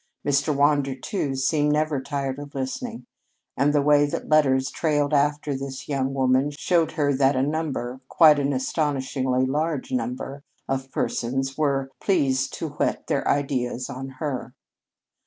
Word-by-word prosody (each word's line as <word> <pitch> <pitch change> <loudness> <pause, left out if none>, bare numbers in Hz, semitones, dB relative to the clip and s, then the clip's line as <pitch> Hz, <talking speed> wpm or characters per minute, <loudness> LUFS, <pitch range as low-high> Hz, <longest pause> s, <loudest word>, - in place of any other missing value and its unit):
Mr. 145 +2 +2
Wander, 140 -1 +2
too, 135 0 -3
seemed 145 +2 +2
never 150 -2 0
tired 135 -1 -3
of 145 -1 -9
listening; 230 - -4 0.5
and 140 +2 +3
the 145 -1 +2
way 145 0 +5
that - - -4
letters 135 -4 +3
trailed 145 -2 0
after 145 0 +1
this 135 0 -6
young 135 -1 -1
woman 130 +1 +2
showed 165 -1 +1
her 145 -2 +1
that 135 +1 +3
a 130 - +2
number 135 -4 -2
quite 155 -3 +6
an 140 0 0
astonishingly 130 -2 0
large 150 +1 -1
number 130 +3 -3 0.2
of 135 0 -3
persons 135 +3 -2
were 135 -3 0
pleased 135 -9 +1
to 160 - -4
whet 150 - -2
their 140 - -1
ideas 130 -2 -1
on 135 0 -6
her. 130 -3 -4
140 Hz, 150 wpm, -24 LUFS, 130-150 Hz, 0.5 s, quite